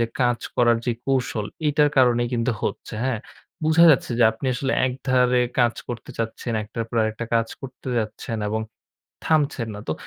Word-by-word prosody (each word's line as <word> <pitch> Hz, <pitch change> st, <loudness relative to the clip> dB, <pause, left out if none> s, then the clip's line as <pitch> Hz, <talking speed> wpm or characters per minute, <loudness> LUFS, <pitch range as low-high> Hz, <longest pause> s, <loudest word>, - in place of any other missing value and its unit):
যে 115 Hz, -, +2 dB
কাজ 120 Hz, -1 st, +2 dB, 0.2 s
করার 120 Hz, -1 st, +4 dB
যে 120 Hz, -, +2 dB
কৌশল 125 Hz, -6 st, 0 dB, 0.2 s
এটার 145 Hz, 0 st, +3 dB
কারণেই 120 Hz, -2 st, +4 dB
কিন্তু 115 Hz, +1 st, +1 dB
হচ্ছে। -, -, -4 dB
হ্যাঁ? 130 Hz, -4 st, 0 dB, 0.5 s
বুঝা 160 Hz, +2 st, +6 dB
যাচ্ছে 135 Hz, -, +2 dB
যে -, -, +5 dB
আপনি 115 Hz, +4 st, -6 dB
আসলে 135 Hz, +2 st, -1 dB
একধারে 125 Hz, -1 st, +2 dB, 0.2 s
কাজ 120 Hz, -1 st, +3 dB
করতে 120 Hz, -1 st, -6 dB
চাচ্ছেন, 115 Hz, +1 st, -3 dB
একটার 115 Hz, +2 st, -4 dB
পর 115 Hz, -, -5 dB
আরেকটা 110 Hz, +2 st, -2 dB
কাজ 115 Hz, 0 st, +2 dB
করতে 130 Hz, 0 st, -9 dB
যাচ্ছেন 110 Hz, +1 st, -4 dB
এবং 110 Hz, +1 st, -1 dB, 0.6 s
থামছেন 145 Hz, -7 st, +1 dB
না। 105 Hz, -, -7 dB
তো 80 Hz, -, +2 dB
120 Hz, 175 wpm, -23 LUFS, 115-130 Hz, 0.6 s, বুঝা